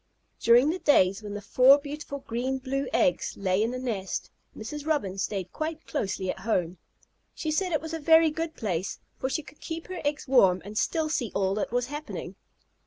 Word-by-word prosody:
During 245 +6 +5
the 365 - -4
days 195 - +4
when 205 -1 -6
the 205 - -6
four 255 +6 +6
beautiful 285 -1 -6
green 250 +3 -1
blue 270 +1 -2
eggs 180 - +1
lay 190 0 +1
in 225 - +2
the 250 - -4
nest, 220 -7 -3 0.3
Mrs. 295 +7 -6
Robin 200 -12 0
stayed 195 -2 -3
quite 315 0 -4
closely 190 -8 -2
at - - -9
home. 180 -4 -1 0.6
She 315 - -2
said 365 +4 0
it 310 - +1
was 320 +1 -6
a 325 - -2
very 320 +1 +6
good 325 +1 -4
place, 190 -5 -2 0.2
for 260 - -1
she 315 +3 -2
could 290 - -15
keep 325 +2 -6
her 370 -1 -5
eggs 290 0 -2
warm 195 -9 +5
and 205 +1 -8
still 315 +8 +1
see 250 -8 -1
all 190 -1 +1
that 210 +2 -2
was 245 0 +1
happening. 295 +3 -6
260 Hz, 200 wpm, -27 LUFS, 200-305 Hz, 0.6 s, four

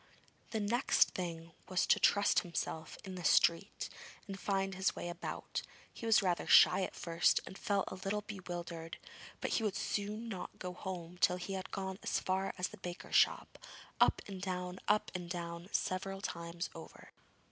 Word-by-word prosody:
The 220 - -1
next 230 +5 +3
thing 165 -2 -5 0.2
was 185 -2 +2
to - - +4
trust 205 0 +5
himself 160 -2 -4
in 190 - -6
the 180 -1 -6
street, 170 +5 +3 0.4
and 195 -1 -6
find 195 -1 0
his 190 +1 +1
way 175 - -4
about. 175 0 -4 0.3
He 230 - -6
was 220 -2 +6
rather 180 -2 +1
shy - - +8
at - - -3
first, 170 0 +3
and - - -9
felt 200 -1 0
a - - -5
little 195 +3 -2
bewildered, 175 -4 -6 0.4
but - - -1
he 225 - +1
would 205 -3 0 0.2
not 210 -1 -5
go 180 -1 -5
home 180 -1 -6
till 180 0 +4
he 180 +2 -5
had 190 -1 -4
gone 190 0 -4
as - - 0
far 190 +1 0
as 180 0 0
the 215 - -11
baker's 175 -2 -6
shop - - +3 0.4
up - - +4
and 195 -2 -6
down, 180 -1 -3
up 210 0 +3
and 180 -2 -5
down, 170 0 -5
several 195 +1 -1
times 170 -2 -4
over. - - -11
185 Hz, 175 wpm, -35 LUFS, 175-195 Hz, 0.4 s, shy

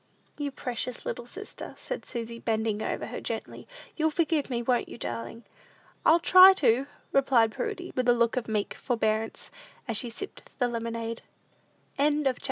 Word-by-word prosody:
"You 290 -1 -1
precious 250 -2 -4
little 240 - -4
sister," 410 +10 -9
said - - -6
Susy, 230 0 -5
bending 220 -2 -1
over - - -2
her - - -6
gently, - - -5 0.3
"you'll 315 0 +2
forgive 315 -2 0
me; 240 -2 -1
won't 245 0 +1
you, - - -8
darling?" 120 - -5 0.6
"I'll 330 +2 +6
try 370 +2 +9
to," 265 -5 +2 0.2
replied 255 -5 +4
Prudy, 405 - -4
with 250 -1 +1
a - - +7
look 235 0 +2
of 250 -2 -2
meek 215 -2 -1
forbearance, 225 -3 -1 0.4
as 230 -3 +1
she 240 - 0
sipped 395 +13 -9
the 245 - +2
lemonade. 230 -1 -4 0.8
CHAPTER 290 -2 +3
VII. - - -18
245 Hz, 165 wpm, -28 LUFS, 230-290 Hz, 0.8 s, try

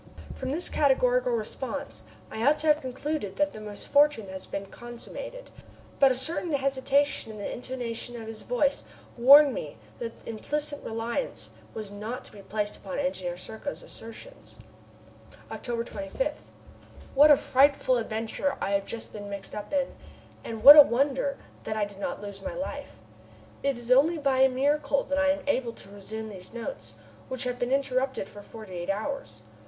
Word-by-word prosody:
From 260 - -5
this 315 +6 -1
categorical - - +3
response 465 - -4 0.3
I 220 - -3
ought 290 +4 +5
to 300 - -3
have 300 - -10
concluded 260 -4 -3
that 295 0 +1
the 215 - -8
misfortune 220 +2 +2
had 190 0 -6
been 195 0 -4
consummated, - - -9 0.5
but 275 - +7
a - - +1
certain 325 +5 -2
hesitation 275 -2 +1
in 215 - -9
the 205 - -4
intonation 240 -1 -5
of 220 - -8
his 220 -1 -7
voice 275 +3 0 0.3
warned 275 +3 +8
me 145 - -6 0.2
that 230 -1 -7
implicit 290 +6 -3
reliance 230 - -3 0.2
was 215 -2 -6
not 215 +5 -6
to - - -13
be 205 - -12
placed 210 +1 -3
upon 190 -2 -6
Engineer 185 -11 -2
Serko's 220 +9 -6
assertions. 230 - -11 0.9
October 235 -2 -3
25. 290 - -4 0.6
What 290 +3 +7
a 295 - +8
frightful 270 -1 +3
adventure 225 +5 -2
I 195 - -1
have 200 0 0
just 230 - -5
been 205 -1 -7
mixed 200 -1 -7
up 210 - -6
in, 280 -2 0 0.5
and 225 -1 -6
what 285 +3 +13
a 300 - +13
wonder 275 +1 +1 0.3
I 215 -1 0
did 200 -1 -12
not 205 - -4
lose 200 -1 -7
my 275 -2 -5
life! 285 +1 -5 0.7
It 275 -2 0
is 240 +1 -6
only 300 +6 +5
by 275 -3 +1
a 265 0 +7
miracle 280 +2 +1
that 280 0 -1
I 290 - +3
am 285 0 +1
able 255 -4 0
to 195 - -13
resume 215 +2 -6
these 190 -1 -10
notes, 115 - -6 0.3
which 260 0 -3
have 250 0 -3
been 245 +1 -1
interrupted 265 -5 0
for 205 - -11
forty 215 -2 -11
eight 175 +1 -5
hours. 200 - -3
255 Hz, 170 wpm, -28 LUFS, 215-285 Hz, 0.9 s, what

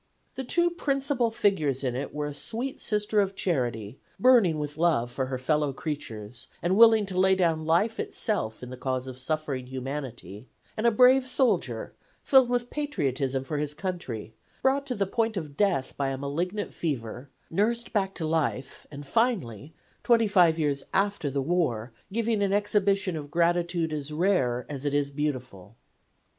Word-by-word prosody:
The 265 - -4
two 345 +7 +2
principal 275 -6 0
figures 155 - +1
in 125 -2 -1
it 135 - -4
were 150 0 -3
a 145 - -4
sweet 240 - -4
Sister 210 0 +1
of 195 -1 -2
Charity, 120 - -2 0.2
burning 235 -11 +5
with 150 -1 -4
love 155 -8 +1
for 130 +1 -2
her 130 0 -3
fellow 150 +2 0
creatures, 125 -7 -6 0.2
and 175 +2 +2
willing 225 -1 +7
to 185 -2 -3
lay 190 0 +5
down 165 -4 +1
life 205 +8 +2
itself 150 - -2
in 125 - -7
the 130 - -7
cause 130 -1 -2
of 130 -1 -8
suffering 140 -2 -2
humanity, 130 -5 -6 0.3
and 225 +2 +1
a - - +5
brave 255 +3 +5
soldier, 255 0 +1 0.3
filled 265 -3 +5
with 245 0 -1
patriotism 135 - -1
for 150 +2 -3
his 150 0 -2
country, 150 - -5 0.3
brought 275 +1 +2
to 250 - -2
the 200 - 0
point 225 +2 -1
of 150 -5 -5
death 185 -10 +1
by 140 -1 -1
a 135 - -3
malignant 170 +9 -3
fever; 130 -4 -4 0.2
nursed 230 +7 0
back 195 -3 0
to 165 - -3
life 155 -4 -2
and 145 -1 -9
finally, 160 - 0 0.3
twenty 230 -2 +4
five 175 -5 +4
years 145 -3 0
after 195 -5 +1
the 140 0 -1
war, 130 -9 0 0.2
giving 225 0 0
an 200 -1 +1
exhibition 200 -3 +1
of 145 -2 -6
gratitude 170 0 +1
as 150 -1 -4
rare 150 -8 +1
as 140 -2 -6
it 145 -1 0
is 145 -1 0
beautiful. 125 -9 -4
160 Hz, 170 wpm, -27 LUFS, 135-210 Hz, 0.3 s, willing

